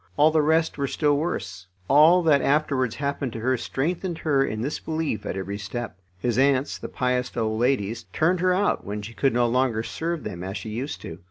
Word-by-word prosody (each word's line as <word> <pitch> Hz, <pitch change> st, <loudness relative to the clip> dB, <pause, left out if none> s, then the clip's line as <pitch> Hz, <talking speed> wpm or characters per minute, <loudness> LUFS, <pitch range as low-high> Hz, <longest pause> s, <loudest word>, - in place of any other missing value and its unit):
All 155 Hz, +2 st, +5 dB
the 155 Hz, -1 st, +3 dB
rest 160 Hz, 0 st, +1 dB
were 140 Hz, -, 0 dB
still 145 Hz, +1 st, +1 dB
worse. 140 Hz, -, -3 dB, 0.2 s
All 160 Hz, +5 st, +6 dB
that 150 Hz, -4 st, +4 dB
afterwards 140 Hz, -5 st, +1 dB
happened 140 Hz, -2 st, -2 dB
to 115 Hz, -, -5 dB
her 130 Hz, +3 st, +2 dB
strengthened 165 Hz, +8 st, -2 dB
her 140 Hz, -4 st, +2 dB
in 110 Hz, -4 st, -3 dB
this 140 Hz, +6 st, -2 dB
belief 160 Hz, -7 st, -3 dB
at -, -, -3 dB
every 100 Hz, +2 st, -4 dB
step. 110 Hz, +3 st, -5 dB, 0.2 s
His 120 Hz, +6 st, 0 dB
aunts, 135 Hz, 0 st, +2 dB
the -, -, -6 dB
pious 125 Hz, -1 st, -1 dB
old 110 Hz, -1 st, 0 dB
ladies, 115 Hz, -3 st, 0 dB
turned 175 Hz, +3 st, +2 dB
her 185 Hz, +1 st, +3 dB
out 195 Hz, +3 st, +1 dB
when 105 Hz, +1 st, -5 dB
she 110 Hz, +3 st, -8 dB
could 135 Hz, +3 st, +1 dB
no 120 Hz, 0 st, +2 dB
longer 120 Hz, -2 st, +1 dB
serve 165 Hz, +3 st, -3 dB
them 90 Hz, -3 st, -6 dB
as 95 Hz, +2 st, -4 dB
she 110 Hz, -, -7 dB
used 125 Hz, +7 st, -4 dB
to. 80 Hz, +1 st, -8 dB
135 Hz, 210 wpm, -25 LUFS, 115-155 Hz, 0.2 s, All